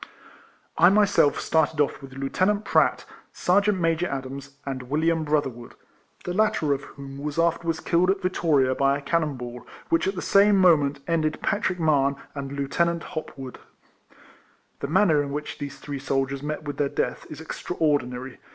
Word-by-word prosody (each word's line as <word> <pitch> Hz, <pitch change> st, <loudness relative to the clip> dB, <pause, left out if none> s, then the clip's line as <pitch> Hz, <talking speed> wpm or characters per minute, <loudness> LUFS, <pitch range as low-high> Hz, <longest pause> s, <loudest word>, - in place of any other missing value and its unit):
I 175 Hz, +2 st, +8 dB
myself 200 Hz, -7 st, +3 dB
started 160 Hz, -1 st, +1 dB
off 145 Hz, 0 st, +1 dB
with 135 Hz, -1 st, -11 dB
Lieuten 140 Hz, +8 st, +1 dB
ant 210 Hz, 0 st, -1 dB
Pratt, -, -, +2 dB, 0.3 s
Sergeant 200 Hz, +2 st, +2 dB
Major 165 Hz, +1 st, +1 dB
Adams, 135 Hz, 0 st, -6 dB
and 130 Hz, -2 st, -5 dB
William 160 Hz, +2 st, +1 dB
Brother 150 Hz, -3 st, +1 dB
wood, 120 Hz, 0 st, -13 dB, 0.5 s
the 180 Hz, -, -3 dB
latter 180 Hz, -7 st, +2 dB
of 140 Hz, -, -3 dB
whom 140 Hz, -1 st, -10 dB
was 150 Hz, +1 st, -4 dB
afterwards 165 Hz, -1 st, +1 dB
killed 175 Hz, +2 st, +2 dB
at 195 Hz, 0 st, 0 dB
Vittoria 150 Hz, -8 st, +2 dB
by 140 Hz, +1 st, +2 dB
a -, -, -8 dB
cannon 155 Hz, -2 st, 0 dB
ball, 125 Hz, -1 st, -8 dB, 0.3 s
which 165 Hz, -, +2 dB
at 195 Hz, -, -1 dB
the 180 Hz, -, -4 dB
same 200 Hz, +1 st, +5 dB
moment 145 Hz, -7 st, +4 dB
ended 155 Hz, -2 st, 0 dB
Patrick 190 Hz, -3 st, 0 dB
Mahon 140 Hz, -4 st, +2 dB, 0.2 s
and 140 Hz, -1 st, -6 dB
Lieutenant 165 Hz, +5 st, 0 dB
Hop 155 Hz, -2 st, -6 dB
wood.* 130 Hz, -2 st, -8 dB, 0.6 s
* -, -, -29 dB
The 140 Hz, -, -3 dB
manner 165 Hz, -2 st, +3 dB
in 145 Hz, -, -4 dB
which 150 Hz, +1 st, -5 dB
these 140 Hz, -1 st, -6 dB
three 140 Hz, 0 st, -6 dB
soldiers 135 Hz, 0 st, -1 dB
met 150 Hz, +1 st, -4 dB
with 145 Hz, -1 st, -5 dB
their 145 Hz, -1 st, +1 dB
death -, -, -3 dB
is 155 Hz, -, -8 dB
extraordinary. 140 Hz, -6 st, -2 dB
150 Hz, 175 wpm, -25 LUFS, 140-170 Hz, 0.6 s, I